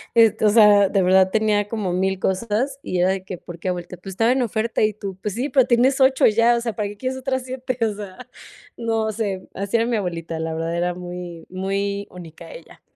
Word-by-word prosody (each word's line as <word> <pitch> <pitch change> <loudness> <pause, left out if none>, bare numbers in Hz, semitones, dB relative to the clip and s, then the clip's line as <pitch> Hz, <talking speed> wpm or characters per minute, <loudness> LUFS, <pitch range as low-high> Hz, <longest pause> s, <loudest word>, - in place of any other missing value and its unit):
este 220 -2 +4
O - - +6
sea, 205 -2 +6
de 195 - +1
verdad 190 +1 +4
tenía 210 -1 +1
como 205 -5 -3
1000 190 +1 0
cosas 230 +9 -1
y 180 - -2
era 180 +1 +3
de 190 -1 -2
que: 185 -2 -6
“¿Por 170 0 -11
qué, 185 - -6
abuelita?”. 180 0 -4
“Pues 190 +2 -9
estaba 225 +6 +2
en 260 -1 +2
oferta”. 225 0 -1
Y 215 0 +2
tú: 195 -2 -7
“Pues 210 -1 -3
sí, 265 +5 -2
pero 265 -3 +4
tienes 255 +3 +3
8 265 0 +4
ya, 230 +2 +4
o 235 - -1
sea, 230 -2 -3
¿para 210 -2 -2
qué 205 - -8
quieres 260 +2 -3
otras 260 -1 -2
7?”. 255 0 -4
O 215 - -1
sea, 210 +5 -10 0.5
no 225 -2 -1
sé, 200 -4 -4
así 200 +3 -3
era 230 - +1
mi 235 -2 0
abuelita, 165 -4 -4
la 160 0 -3
verdad, 165 +1 -2
era 175 +1 0
muy 175 -1 -8
muy 200 +2 -2
única 170 -3 -11
ella. - - -13
205 Hz, 230 wpm, -22 LUFS, 185-230 Hz, 0.5 s, O